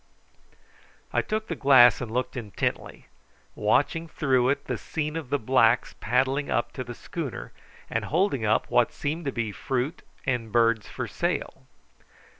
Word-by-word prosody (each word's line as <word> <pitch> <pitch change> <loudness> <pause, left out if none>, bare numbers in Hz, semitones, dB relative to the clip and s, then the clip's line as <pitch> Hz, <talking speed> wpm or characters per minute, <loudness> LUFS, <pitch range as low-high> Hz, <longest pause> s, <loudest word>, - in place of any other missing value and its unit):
I - - +3
took 215 +1 -3
the 165 - -3
glass 130 -4 +6
and 120 - -4
looked 125 +3 -2
intently, 110 -5 -4 0.5
watching 165 0 +1
through 130 -5 +1
it 140 +1 -1
the - - -3
scene 150 0 -3
of 160 -6 -5
the 145 - +2
blacks 115 -2 +3
paddling 130 +5 +1
up 120 +2 0
to 130 - -4
the 120 -1 -8
schooner, 155 -2 -6 0.4
and - - -2
holding 165 - +1
up 110 0 +1
what 120 -1 +3
seemed 155 +3 -4
to 140 - 0
be 115 -4 -2
fruit 130 - -3 0.2
and 120 -4 -1
birds 115 -2 +2
for - - -4
sale. - - -3
130 Hz, 155 wpm, -26 LUFS, 120-150 Hz, 0.5 s, glass